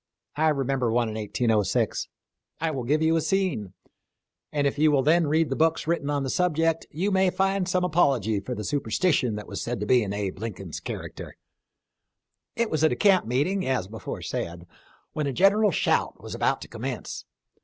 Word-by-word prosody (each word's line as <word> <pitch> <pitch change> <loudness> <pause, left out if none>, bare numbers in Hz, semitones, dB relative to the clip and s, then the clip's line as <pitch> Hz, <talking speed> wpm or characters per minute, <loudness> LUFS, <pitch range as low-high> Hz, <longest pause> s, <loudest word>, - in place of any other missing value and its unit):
I 160 +2 +2
remember 135 -4 0
one 120 -1 +1
in - - -5
1806. 110 0 0 0.5
I 160 0 0
will 130 -5 -4
give 150 +5 +2
you 160 +1 +3
a - - +1
scene, 180 - -1 0.8
and 145 -1 0
if 140 +1 0
you 155 0 +5
will 140 -2 +3
then 160 +2 +4
read 155 0 +2
the - - +1
books 160 +2 +1
written 160 -3 -1
on 145 -1 0
the 135 - -2
subject 165 -2 +1
you 185 +7 -1
may 190 -1 +3
find 195 0 0
some 180 0 +1
apology 135 - +2
for 125 +5 -5
the 105 - -5
superstition 130 - +1
that 105 - -6
was 100 - -6
said 120 -2 -3
to 105 - -2
be 125 +2 +4
in 100 -3 -3
Abe 100 -2 -3
Lincoln's 95 -6 -6
character. - - -7 1.2
It 235 -1 0
was 155 -1 0
at 155 - +5
a - - 0
camp 195 - +3
meeting, 150 +11 0
as 130 -8 0
before 110 +2 -7
said, 85 +1 -4 0.5
when 150 -2 -1
a - - 0
general 205 - +4
shout - - 0
was - - -8
about - - 0
to - - -8
commence. - - -5
145 Hz, 195 wpm, -26 LUFS, 115-170 Hz, 1.2 s, you